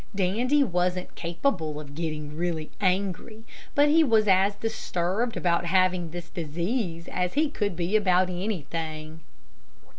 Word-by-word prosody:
Dandy 235 Hz, +10 st, +2 dB
wasn't 180 Hz, -4 st, -1 dB
capable 170 Hz, -, -2 dB
of 145 Hz, -2 st, -10 dB
getting 150 Hz, -2 st, -4 dB
really 165 Hz, -2 st, -2 dB
angry, 195 Hz, +3 st, -1 dB, 0.3 s
but 290 Hz, +1 st, +5 dB
he 320 Hz, +2 st, +5 dB
was 220 Hz, -6 st, +3 dB
as 195 Hz, +1 st, +4 dB
disturbed 220 Hz, 0 st, -2 dB
about 175 Hz, -1 st, +1 dB
having 185 Hz, -1 st, +2 dB
this 175 Hz, +1 st, -7 dB
disease 170 Hz, -, -3 dB
as 180 Hz, -1 st, -1 dB
he 295 Hz, +1 st, +2 dB
could 205 Hz, -9 st, -1 dB
be 175 Hz, +4 st, -1 dB
about 185 Hz, -3 st, +4 dB
anything. 160 Hz, -4 st, -4 dB
180 Hz, 130 wpm, -27 LUFS, 170-215 Hz, 0.3 s, but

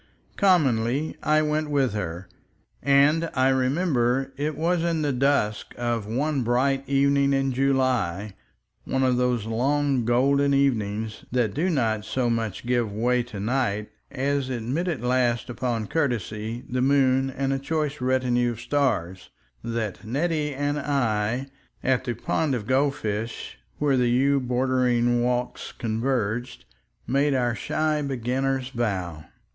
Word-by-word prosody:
Commonly 140 Hz, -, +2 dB
I 155 Hz, 0 st, +3 dB
went 155 Hz, 0 st, -1 dB
with 135 Hz, -6 st, +1 dB
her. 90 Hz, -3 st, -4 dB, 0.5 s
And 145 Hz, +4 st, +4 dB
I 130 Hz, 0 st, +3 dB
remember 130 Hz, -1 st, +1 dB
it 150 Hz, +2 st, -2 dB
was 170 Hz, +1 st, +1 dB
in 165 Hz, -2 st, 0 dB
the 145 Hz, -2 st, 0 dB
dusk 125 Hz, -5 st, 0 dB
of 120 Hz, -3 st, -2 dB
one 140 Hz, +5 st, 0 dB
bright 130 Hz, +3 st, +1 dB
evening 140 Hz, 0 st, +3 dB
in 135 Hz, -1 st, +1 dB
July, 125 Hz, -8 st, 0 dB, 0.5 s
one 130 Hz, 0 st, -1 dB
of 130 Hz, -1 st, +2 dB
those 125 Hz, -3 st, +1 dB
long 135 Hz, +3 st, +1 dB
golden 140 Hz, +4 st, +3 dB
evenings 110 Hz, -5 st, 0 dB
that 120 Hz, -5 st, +1 dB
do 170 Hz, +6 st, 0 dB
not 115 Hz, -, 0 dB
so 120 Hz, +2 st, -1 dB
much 115 Hz, -2 st, -3 dB
give 120 Hz, -3 st, 0 dB
way 120 Hz, +4 st, +1 dB
to 120 Hz, -4 st, -8 dB
night 105 Hz, -2 st, -1 dB, 0.2 s
as 140 Hz, 0 st, -1 dB
admit 130 Hz, +8 st, -2 dB
at 160 Hz, -9 st, -2 dB
last, 125 Hz, -1 st, +1 dB
upon 120 Hz, -3 st, -2 dB
courtesy, 115 Hz, -4 st, -2 dB
the 125 Hz, +1 st, -1 dB
moon 135 Hz, -1 st, +3 dB
and 135 Hz, +1 st, -1 dB
a 135 Hz, -, -1 dB
choice 150 Hz, -1 st, -2 dB
retinue 125 Hz, -1 st, +1 dB
of 110 Hz, -, -11 dB
stars, 120 Hz, -12 st, -1 dB, 0.3 s
that 115 Hz, -5 st, -3 dB
Nettie 150 Hz, +6 st, -1 dB
and 145 Hz, +1 st, -1 dB
I, 120 Hz, -4 st, 0 dB, 0.4 s
at 130 Hz, 0 st, +1 dB
the 120 Hz, -2 st, -2 dB
pond 140 Hz, +4 st, 0 dB
of 110 Hz, -4 st, -4 dB
goldfish 120 Hz, -5 st, -1 dB, 0.2 s
where 145 Hz, -3 st, +2 dB
the 125 Hz, -1 st, +2 dB
yew 135 Hz, +3 st, +3 dB
bordered 125 Hz, -1 st, +1 dB, 0.2 s
walks 125 Hz, 0 st, -2 dB
converged, 115 Hz, 0 st, -2 dB, 0.4 s
made 140 Hz, +2 st, +2 dB
our 120 Hz, -2 st, +1 dB
shy 155 Hz, +5 st, -1 dB
beginners' 135 Hz, 0 st, -1 dB
vow. 95 Hz, -, -3 dB
130 Hz, 140 wpm, -25 LUFS, 115-140 Hz, 0.5 s, And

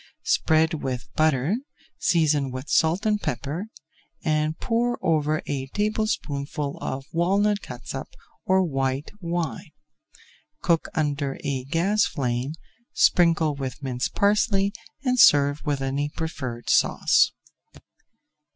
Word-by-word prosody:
Spread 160 Hz, +1 st, +3 dB
with 125 Hz, -2 st, -4 dB
butter, 155 Hz, -, +2 dB, 0.4 s
season 150 Hz, -5 st, +2 dB
with 130 Hz, +2 st, -6 dB
salt 170 Hz, +7 st, +2 dB
and 210 Hz, -1 st, +1 dB
pepper, 145 Hz, -, -3 dB, 0.6 s
and 155 Hz, -1 st, 0 dB
pour 240 Hz, +1 st, 0 dB
over 155 Hz, -1 st, +1 dB
a 135 Hz, -2 st, -3 dB
tablespoonful 150 Hz, -8 st, -2 dB
of 135 Hz, 0 st, -4 dB
walnut 200 Hz, +4 st, +2 dB
catsup 125 Hz, -2 st, -7 dB, 0.4 s
or 190 Hz, 0 st, +3 dB
white 135 Hz, -3 st, -1 dB
wine. 170 Hz, -1 st, -3 dB, 0.9 s
Cook 170 Hz, -2 st, +2 dB
under 145 Hz, -3 st, -1 dB
a 135 Hz, -2 st, -2 dB
gas 190 Hz, +9 st, +2 dB
flame, 130 Hz, -1 st, -2 dB, 0.4 s
sprinkle 165 Hz, -3 st, +4 dB
with 140 Hz, +1 st, -6 dB
minced 125 Hz, -2 st, -2 dB
parsley, 200 Hz, -1 st, +2 dB, 0.3 s
and 255 Hz, -2 st, +1 dB
serve 145 Hz, -3 st, +6 dB
with 140 Hz, -2 st, 0 dB
any 140 Hz, +2 st, -1 dB
preferred 130 Hz, -7 st, -5 dB
sauce. -, -, +4 dB
155 Hz, 110 wpm, -25 LUFS, 135-180 Hz, 0.9 s, serve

